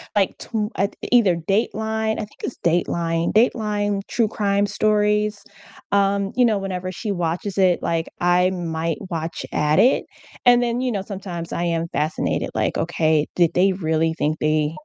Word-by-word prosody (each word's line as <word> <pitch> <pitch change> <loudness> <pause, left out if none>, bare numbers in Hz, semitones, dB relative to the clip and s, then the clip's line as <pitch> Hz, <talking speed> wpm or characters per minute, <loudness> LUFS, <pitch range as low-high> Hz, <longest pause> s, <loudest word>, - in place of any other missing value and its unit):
Like, 195 -2 +1
tw 215 -2 -3
uh, 200 - +1 0.2
either 225 -8 +5
Dateline 220 +5 -1
I 215 - -3
think 210 - -21
it's - - -4
Dateline 170 0 0
Dateline 210 -3 +1
true 230 -2 +1
crime 200 -1 +1
stories, 210 0 +1 0.5
um, 200 0 +2
you 250 0 +4
know, 220 -3 +2
whenever 185 -1 -4
she 205 +3 -4
watches 175 +2 -2
it, 185 -2 +3
like, 165 -1 -1
I 180 +1 +4
might 165 -2 -2
watch 165 -1 -4
at 150 +1 +2
it, 255 - +4 0.4
and 245 0 +6
then, 240 +1 -1
you 255 -1 0
know, 200 -4 -2
sometimes 185 -4 -6
I 170 - -2
am 170 -1 -1
fascinated, 155 0 -1
like, - - 0
"Okay, 160 -3 +1
did 170 -2 +3
they 190 +2 +3
really 160 -3 0
think 155 -1 -1
they" 155 0 +1
190 Hz, 165 wpm, -22 LUFS, 165-210 Hz, 0.5 s, and